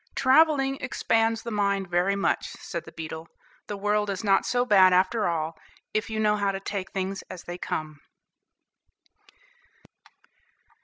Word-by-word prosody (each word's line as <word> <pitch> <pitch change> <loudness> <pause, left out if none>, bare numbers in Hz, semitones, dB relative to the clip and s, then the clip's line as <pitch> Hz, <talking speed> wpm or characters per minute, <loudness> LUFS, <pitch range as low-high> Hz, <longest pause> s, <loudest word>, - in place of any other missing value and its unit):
"Travelling 275 0 +4
expands 225 -3 0
the 235 - -5
mind 200 -2 0
very 175 +3 +1
much," 200 - -1
said 170 -2 -6
the - - -11
beetle. 160 0 -7 0.4
"The 205 - -4
world 210 +1 0
is 195 +1 -3
not 195 -2 +3
so 245 0 +1
bad 190 -5 +6
after 190 +3 +2
all, 165 -1 -2 0.4
if 215 +1 -1
you 220 0 -3
know 210 -1 +3
how 200 -1 +1
to 195 - -4
take 195 -1 -4
things 195 +1 -3
as 180 - -8
they 175 +1 -7
come." 155 -2 -4
200 Hz, 150 wpm, -26 LUFS, 185-220 Hz, 0.4 s, bad